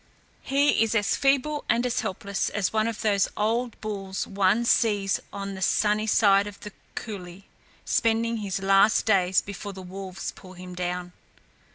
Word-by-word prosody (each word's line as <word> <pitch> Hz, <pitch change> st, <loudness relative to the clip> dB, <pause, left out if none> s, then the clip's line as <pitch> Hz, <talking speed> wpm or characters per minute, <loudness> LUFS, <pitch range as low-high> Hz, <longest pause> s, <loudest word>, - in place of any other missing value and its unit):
He 280 Hz, 0 st, +2 dB
is 225 Hz, 0 st, +1 dB
as 210 Hz, -1 st, +2 dB
feeble 280 Hz, +2 st, +1 dB
and 235 Hz, +2 st, +2 dB
as 250 Hz, 0 st, 0 dB
helpless 200 Hz, +2 st, -2 dB
as 205 Hz, -1 st, -1 dB
one 220 Hz, 0 st, +2 dB
of 230 Hz, -2 st, -4 dB
those 200 Hz, -2 st, +2 dB
old 230 Hz, +3 st, -1 dB
bulls 195 Hz, -3 st, -4 dB
one 200 Hz, +4 st, +1 dB
sees 205 Hz, -5 st, +2 dB
on 200 Hz, 0 st, -5 dB
the 190 Hz, -, -8 dB
sunny 210 Hz, +3 st, +2 dB
side 200 Hz, -2 st, +4 dB
of 205 Hz, -1 st, -9 dB
the 210 Hz, -, -8 dB, 0.2 s
coulée, 190 Hz, -3 st, -7 dB, 0.4 s
spending 230 Hz, 0 st, +1 dB
his 195 Hz, -2 st, -3 dB
last 195 Hz, +2 st, +4 dB
days 190 Hz, -4 st, +3 dB
before 200 Hz, 0 st, -7 dB
the 190 Hz, 0 st, -9 dB
wolves 190 Hz, 0 st, -6 dB
pull 185 Hz, -1 st, -14 dB
him 180 Hz, 0 st, -10 dB
down." 180 Hz, 0 st, -3 dB
205 Hz, 165 wpm, -26 LUFS, 190-225 Hz, 0.4 s, side